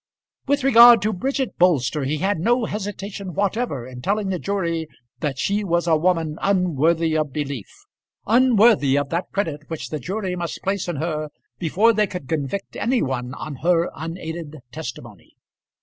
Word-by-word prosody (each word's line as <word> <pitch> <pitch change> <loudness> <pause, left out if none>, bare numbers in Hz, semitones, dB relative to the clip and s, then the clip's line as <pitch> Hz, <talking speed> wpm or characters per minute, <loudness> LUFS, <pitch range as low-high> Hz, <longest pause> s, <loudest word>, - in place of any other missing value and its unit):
With 285 0 +1
regard 235 -4 +8
to 215 +1 +1
Bridget 265 +6 -2
Bolster, 150 -5 +2
he 150 +3 -1
had 190 +2 0
no 235 +6 +2
hesitation 200 -3 -5
whatever 200 - -1
in 125 -1 -9
telling 200 +6 0
the 185 -2 -2
jury 170 -5 -2 0.3
that 145 -4 -2
she 200 +8 0
was 170 -2 0
a 165 -2 +4
woman 165 -1 0
unworthy 165 -4 +2
of 155 -2 0
belief, 140 -8 -4 0.6
unworthy 225 - +4
of 145 -1 -1
that 170 +2 -2
credit 155 -7 -3
which 160 -2 -5
the 155 - -4
jury 190 - -3
must 170 -1 -5
place 195 -1 -1
in 175 - -2
her 155 0 -3 0.3
before 195 +7 +3
they 210 -1 +2
could 180 -8 -7
convict 160 +6 -3
any 245 +1 +1
one 130 -1 -3
on 145 -2 -6
her 170 +3 +1
unaided 160 -1 -6 0.2
testimony. - - -9
175 Hz, 165 wpm, -22 LUFS, 155-200 Hz, 0.6 s, regard